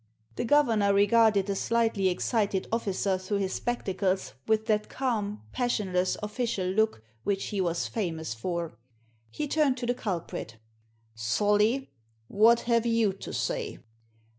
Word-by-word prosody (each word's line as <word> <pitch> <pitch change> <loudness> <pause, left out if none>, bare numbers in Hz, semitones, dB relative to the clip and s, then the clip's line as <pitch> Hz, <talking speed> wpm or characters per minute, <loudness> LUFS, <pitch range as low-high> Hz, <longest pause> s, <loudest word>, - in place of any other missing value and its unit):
The - - -2
governor 225 -7 +3
regarded 205 0 +4
the 200 -1 -2
slightly 225 -2 +1
excited 200 +1 0
officer 195 -4 0
through 185 +2 -2
his 190 -1 -1
spectacles 195 - -1
with 220 0 +2
that 215 -2 0
calm, 215 - -2
passionless, 190 -7 0
official 210 -3 -2
look 200 - +1 0.2
which 195 +4 -1
he 205 -3 -1
was 170 -2 0
famous 165 - -3
for. 165 +2 -4 0.5
He 295 - -4
turned 285 -3 +2
to 245 - -3
the 245 - +1
culprit 170 - -5 0.4
" 110 - -40
Solly, 210 - +1 0.4
what 225 - +5
have 235 -1 +1
you 230 -4 +2
to 195 - -8
say - - -2
205 Hz, 140 wpm, -28 LUFS, 185-230 Hz, 0.5 s, what